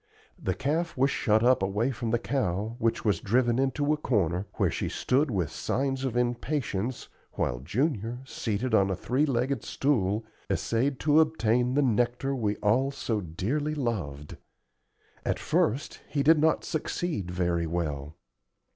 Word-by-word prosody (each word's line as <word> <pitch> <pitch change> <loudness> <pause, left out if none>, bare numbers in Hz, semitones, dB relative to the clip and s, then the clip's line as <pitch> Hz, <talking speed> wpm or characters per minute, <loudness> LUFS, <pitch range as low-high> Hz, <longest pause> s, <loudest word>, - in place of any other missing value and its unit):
The 95 - -1
calf 160 +4 -1
was 135 +2 +3
shut 110 -4 +2
up 125 -2 +4
away 105 +7 0
from 115 -1 -3
the 120 - +2
cow, 115 -4 -1
which 115 0 0
was 100 -6 +2
driven 120 +2 +2
into 145 +3 +1
a - - 0
corner, 95 - 0
where - - +1
she - - -2
stood 140 +4 +1
with 90 - -1
signs 135 0 -1
of 125 -3 -1
impatience 120 -2 -1 0.3
while - - -1
Junior, 115 - -1
seated 115 -1 -2
on 100 -3 +4
a 95 - 0
three 130 +10 0
legged 135 +1 0
stool, 110 -6 0 0.2
essayed 130 +4 0
to 150 +1 +5
obtain 125 -5 +2
the 145 - +4
nectar 125 +2 +1
we 105 -5 0
all 120 +6 +3
so 115 -6 -2
dearly 125 - -2
loved. 80 - -3 0.9
At - - 0
first 130 +8 0
he 145 -2 0
did 155 +2 +6
not 160 +1 +3
succeed 155 - -2
very 85 -2 0
well. 75 -3 -3
120 Hz, 155 wpm, -28 LUFS, 100-135 Hz, 0.9 s, did